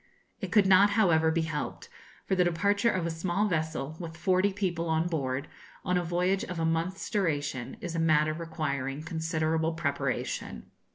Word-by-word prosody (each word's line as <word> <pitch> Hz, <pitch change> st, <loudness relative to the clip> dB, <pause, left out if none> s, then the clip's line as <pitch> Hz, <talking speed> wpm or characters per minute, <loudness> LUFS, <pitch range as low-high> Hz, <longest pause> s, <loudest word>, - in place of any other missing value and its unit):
It -, -, -5 dB
could 210 Hz, -3 st, +5 dB
not, 190 Hz, +2 st, +6 dB
however, 160 Hz, -6 st, +4 dB
be 165 Hz, 0 st, +1 dB
helped; 155 Hz, -2 st, -4 dB, 0.4 s
for -, -, -1 dB
the 185 Hz, -1 st, +4 dB
departure 200 Hz, +6 st, +2 dB
of 185 Hz, -6 st, 0 dB
a 170 Hz, -, -1 dB
small 175 Hz, +5 st, 0 dB
vessel, 160 Hz, -3 st, -2 dB
with 165 Hz, -2 st, -7 dB
forty 185 Hz, +3 st, +2 dB
people 175 Hz, -4 st, -2 dB
on 160 Hz, +1 st, +2 dB
board, 140 Hz, -4 st, -2 dB, 0.4 s
on 180 Hz, -1 st, +1 dB
a 180 Hz, -, +1 dB
voyage 180 Hz, +3 st, 0 dB
of 180 Hz, -2 st, -5 dB
a 165 Hz, -, +1 dB
month's 165 Hz, +4 st, -1 dB
duration, 145 Hz, -, -1 dB
is 175 Hz, -, -4 dB
a 165 Hz, -, -1 dB
matter 155 Hz, -1 st, +3 dB
requiring 155 Hz, -4 st, -3 dB
considerable 160 Hz, 0 st, -1 dB
preparation. 140 Hz, -, -3 dB
165 Hz, 170 wpm, -29 LUFS, 155-180 Hz, 0.4 s, not